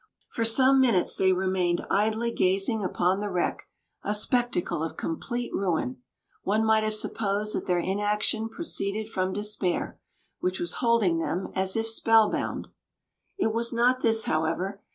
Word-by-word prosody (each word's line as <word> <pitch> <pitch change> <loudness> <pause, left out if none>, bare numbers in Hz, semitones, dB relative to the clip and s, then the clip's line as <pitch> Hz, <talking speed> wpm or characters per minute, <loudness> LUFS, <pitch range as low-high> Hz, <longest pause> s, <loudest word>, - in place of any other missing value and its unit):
For 230 - -1
some 260 +4 +4
minutes 230 -9 +2
they 190 0 +3
remained 185 -2 0
idly 220 +3 +1
gazing 195 +3 +1
upon 185 +1 +1
the 205 0 -3
wreck, 180 -2 -2 0.3
a 210 - -1
spectacle 225 -7 0
of 160 - -5
complete 240 +9 -4
ruin. 160 -10 -1 0.4
One 215 +3 +1
might 220 0 +3
have 215 0 0
supposed 210 -1 -1
that - - -3
their 180 - +2
inaction 210 +4 0
proceeded 220 -7 -3
from 185 -2 -1
despair, 205 -3 -2 0.4
which 185 +1 -1
was 170 - -1
holding 230 -9 +3
them 175 +3 -3
as 190 0 0
if 225 0 0
spellbound. 225 -1 +2 0.7
It 220 - 0
was 235 +1 +1
not 245 +2 +2
this, 225 -2 +2
however. 170 +6 -1
210 Hz, 150 wpm, -27 LUFS, 185-225 Hz, 0.7 s, some